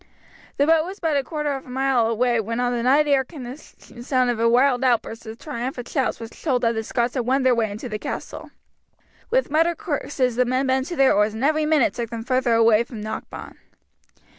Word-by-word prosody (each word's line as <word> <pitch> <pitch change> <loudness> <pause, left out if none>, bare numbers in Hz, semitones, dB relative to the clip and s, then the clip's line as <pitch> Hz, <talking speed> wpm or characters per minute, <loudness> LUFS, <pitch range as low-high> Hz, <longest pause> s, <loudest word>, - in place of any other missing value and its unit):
The 285 - +3
boat 320 0 +4
was 380 +4 -8
but 320 -3 0
a 280 - +1
quarter 300 0 -3
of 270 -1 -5
a - - -12
mile 260 -2 +1
away 235 +1 +1
when 230 +2 -3
on 245 0 0
the 240 - -1
night 280 +5 +3
air 275 -2 +3
came 275 0 -10
the 245 +2 -7
sound 255 -3 -3
of 235 - -4
a 230 0 +3
wild 250 +1 +3
outburst 230 -2 0
of 220 +1 -8
triumphant 250 -3 -5
shouts 265 -4 -1
which 225 0 -10
told 255 -6 0
that 230 0 +2
the 220 0 -3
Scots 240 +2 -1
had 245 -3 -2
won 265 +1 +2
their 255 -1 +4
way 230 -2 0
into 210 +4 -6
the 215 -2 -5
castle. - - -6 0.8
With - - +1
muttered 330 +2 +2
curses 265 -6 -2
the 250 - +3
men 255 +2 0
bent 260 0 0
to 345 - -5
their 270 -3 +4
oars 210 +1 +1
and 225 - -4
every 305 +1 +2
minute 305 -5 +3
took 235 -2 -4
them 230 -1 -5
further 255 -1 +1
away 225 0 +4
from 235 -2 -10
Knockbawn. 215 - -7
250 Hz, 230 wpm, -23 LUFS, 235-280 Hz, 0.8 s, boat